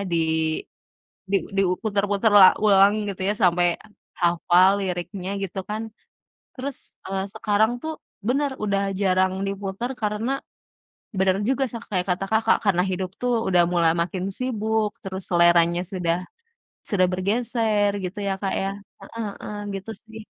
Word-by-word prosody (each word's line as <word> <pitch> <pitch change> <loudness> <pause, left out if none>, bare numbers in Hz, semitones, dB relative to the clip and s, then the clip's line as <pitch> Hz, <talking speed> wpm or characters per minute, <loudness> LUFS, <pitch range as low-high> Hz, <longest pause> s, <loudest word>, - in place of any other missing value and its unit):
di, 165 - +2 1.1
di 200 - +4 0.2
diu 185 -2 +3
putar-putar 205 0 +1
la 190 - +11 0.2
ulang, 200 -1 +6 0.2
gitu 190 -1 -6
ya, - - +2
sampai 175 0 +4 0.5
hafal 175 +2 +4
liriknya, 185 +1 -4
gitu 190 0 -4
kan. 215 +1 -2 0.7
Terus, 265 0 -5 0.3
eee, 195 0 -2
sekarang 215 +2 +2
tuh 315 0 -3 0.3
benar, 275 +3 +1
udah 200 -1 +1 0.2
jarang 185 -1 +2
diputar 200 +5 -4
karena 210 +4 -1 0.9
benar 190 0 +3
juga 270 0 +1
sa 235 - -5
kayak 180 -3 0
kata 195 - -6
Kakak, 220 +1 +3
karena 180 -3 +3
hidup 185 0 -2
tuh, 245 0 +1 0.2
udah 175 -1 +5
mulai 170 -2 +4
makin 180 +2 -2
sibuk, 220 -4 0
terus 190 -1 -5
seleranya 170 0 +4
sudah 170 -2 0 0.7
sudah 185 -3 +3
bergeser, 210 +1 +1
gitu 185 +3 -5
ya, 195 - 0
Kak, 195 - -1
ya. 195 - -1 0.4
Heeh 220 -3 -4
heeh, 210 - -6 0.2
gitu 195 +4 -9
sih. 220 -1 -11
195 Hz, 140 wpm, -24 LUFS, 185-220 Hz, 1.1 s, la